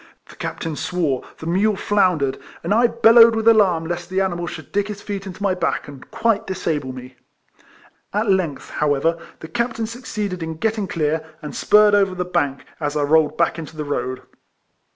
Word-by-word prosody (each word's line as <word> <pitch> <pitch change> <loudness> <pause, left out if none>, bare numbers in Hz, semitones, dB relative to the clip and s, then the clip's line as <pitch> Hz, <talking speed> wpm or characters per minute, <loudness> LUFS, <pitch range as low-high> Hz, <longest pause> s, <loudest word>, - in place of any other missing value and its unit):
The - - -13
captain 160 -2 -4
swore, 160 -7 -1
the - - -9
mule 195 +5 +2
floundered, 180 -9 +1 0.2
and - - 0
I 235 +2 +5
bellowed 230 0 +6
with 225 0 -1
alarm 195 -8 +4
lest 175 +1 -4
the 185 +1 0
animal 175 -3 -1
should 155 -2 -8
dig 205 0 0
his 210 -1 -6
feet 200 -1 -5
into 190 +2 -8
my 195 -2 +2
back, 185 - -1
and 140 -2 -12
quite 225 -1 0
disable 160 -8 -2
me. 130 0 -10 0.9
At 210 +2 0
length, 185 -7 0
however, 150 +3 +1 0.2
the 160 - -7
captain 235 +5 -2
suc 235 +3 -9
ceeded 200 -5 -3
in 160 0 -4
getting 215 +2 -1
clear, 155 -2 -1 0.2
and 150 - -6
spurred 210 0 +5
over 195 -2 +3
the 180 0 -2
bank, 140 -6 -1
as 150 -1 -2
I 145 - +1
rolled 155 +1 +3
back 170 0 +1
into 155 -1 -9
the 150 - -3
road. 130 -2 -3
180 Hz, 190 wpm, -21 LUFS, 155-205 Hz, 0.9 s, bellowed